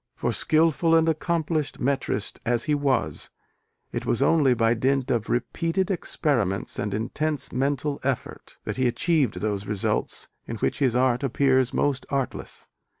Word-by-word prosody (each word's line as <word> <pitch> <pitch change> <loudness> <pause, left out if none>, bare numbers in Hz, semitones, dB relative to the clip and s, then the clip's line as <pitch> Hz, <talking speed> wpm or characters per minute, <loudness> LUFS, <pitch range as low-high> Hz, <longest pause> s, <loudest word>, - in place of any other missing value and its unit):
For, - - -1
skilful 165 +1 +3
and 165 0 +4
accomplished 160 -2 -1
metrist 135 -5 -1
as 120 -1 +1
he 155 -1 0
was, 140 -4 0 0.6
it - - -3
was 120 - 0
only 140 -2 +4
by 115 0 +3
dint 130 +2 0
of 115 -3 -1
"repeated 165 +9 -1
experiments 120 - -1
and 105 - -2
intense 140 +7 -1
mental 140 +2 -1
effort" 135 -2 -4
that - - -4
he 130 -1 +2
achieved 145 - +1
those 100 -2 -2
results 105 -2 -1 0.2
in 115 - -4
which 110 - -1
his 130 -4 +2
art 125 -1 +2
appears 130 -1 +2
most 140 -2 0
artless. 135 -2 -3
135 Hz, 150 wpm, -25 LUFS, 120-155 Hz, 0.6 s, and